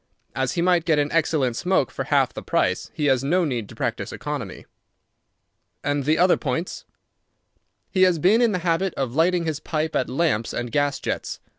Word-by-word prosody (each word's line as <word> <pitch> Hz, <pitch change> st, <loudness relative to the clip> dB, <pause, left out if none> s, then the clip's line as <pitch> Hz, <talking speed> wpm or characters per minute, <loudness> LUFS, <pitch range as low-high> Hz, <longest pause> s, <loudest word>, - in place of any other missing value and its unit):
"As 130 Hz, -1 st, -1 dB
he 170 Hz, -, 0 dB
might 175 Hz, -2 st, +3 dB
get 160 Hz, -3 st, +3 dB
an 145 Hz, 0 st, +1 dB
excellent 150 Hz, -7 st, +1 dB
smoke 180 Hz, -2 st, +1 dB
for -, -, -4 dB
half -, -, +2 dB
the -, -, -6 dB
price, -, -, 0 dB
he 150 Hz, -, -3 dB
has 135 Hz, -2 st, +2 dB
no 175 Hz, +5 st, +2 dB
need 120 Hz, -8 st, -3 dB
to -, -, -11 dB
practise -, -, -3 dB
economy." -, -, -6 dB, 1.2 s
"And 145 Hz, -1 st, -1 dB
the 155 Hz, +2 st, +3 dB
other 180 Hz, +1 st, +4 dB
points?" 160 Hz, +5 st, -3 dB, 1.1 s
"He 185 Hz, -, +1 dB
has 180 Hz, -2 st, +5 dB
been 195 Hz, +9 st, +4 dB
in 235 Hz, -2 st, +4 dB
the 185 Hz, -, 0 dB
habit 175 Hz, +2 st, +1 dB
of 130 Hz, -3 st, -2 dB
lighting 170 Hz, +3 st, +2 dB
his 155 Hz, -2 st, -2 dB
pipe 155 Hz, 0 st, -2 dB
at 130 Hz, -, 0 dB
lamps 130 Hz, -6 st, 0 dB
and 120 Hz, -1 st, -4 dB
gas 145 Hz, +1 st, 0 dB
jets. -, -, -4 dB
155 Hz, 190 wpm, -23 LUFS, 135-175 Hz, 1.2 s, has